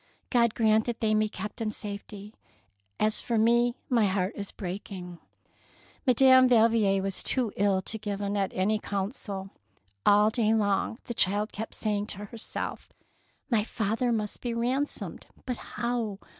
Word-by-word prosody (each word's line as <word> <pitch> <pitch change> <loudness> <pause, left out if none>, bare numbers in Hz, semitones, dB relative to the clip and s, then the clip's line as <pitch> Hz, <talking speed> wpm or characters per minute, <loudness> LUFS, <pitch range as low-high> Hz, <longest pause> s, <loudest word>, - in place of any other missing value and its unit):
God 235 -3 +3
grant 220 -1 +3
that 240 -2 -3
they 215 -1 +1
may 215 0 +3
be - - -4
kept 210 +3 -7
in 220 - 0
safety; 205 0 -6 0.7
as 215 0 +2
for 235 - -1
me 235 +2 +3
my 230 -5 +3
heart 190 0 0
is 200 -1 -6
breaking! 180 -2 -7 0.9
Madame 260 0 +7
Valvier 220 -5 +4
was 195 -1 -1
too 245 -5 +1
ill 195 -1 +2
to 220 - -2
give 205 -1 -4
Annette 200 -1 -1
any 210 +3 +1
counsel. 195 -1 -4 0.5
All 210 +1 +5
day 220 -1 +2
long 205 +1 +1
the 240 - -5
child 205 0 +1
kept 220 +2 -6
saying 210 -1 -1
to 205 -1 -7
herself, 225 +2 -6 0.3
— - - -40
"My 220 -3 +3
father 225 +2 -1
must 215 -2 -2
be 240 -2 -2
ransomed, 255 +5 -2 0.2
but 250 -2 -3 0.2
how 235 -4 -1
215 Hz, 155 wpm, -28 LUFS, 200-230 Hz, 0.9 s, Madame